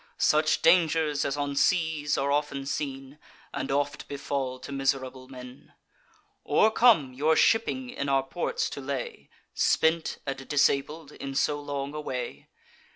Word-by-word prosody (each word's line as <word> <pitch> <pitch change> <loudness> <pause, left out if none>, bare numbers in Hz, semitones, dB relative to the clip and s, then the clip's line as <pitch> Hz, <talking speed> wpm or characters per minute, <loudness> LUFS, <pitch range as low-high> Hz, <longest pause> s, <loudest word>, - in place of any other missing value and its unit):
Such 155 +1 +2
dangers 160 -3 +3
as 140 - -2
on 145 -1 -2
seas 160 -2 +1
are 140 +1 0
often 145 -1 -1
seen, 135 0 -5 0.3
And 135 - -4
oft 140 0 -1
befall 135 -2 -3
to - - -8
miserable 135 -1 -2
men, 125 0 -12 0.7
Or 220 - +3
come, 215 - +4
your 150 +5 +2
shipping 245 +6 +2
in 140 - -3
our 135 -1 +2
ports 150 +6 -2
to 140 - -6
lay, 135 -2 -5 0.2
Spent 160 0 +1
and 135 -1 -5
disabled 145 +1 +1
in 135 -2 -7
so 145 +1 +1
long 145 -1 -4
a 150 - -4
way? 125 -4 -5
140 Hz, 145 wpm, -27 LUFS, 135-155 Hz, 0.7 s, come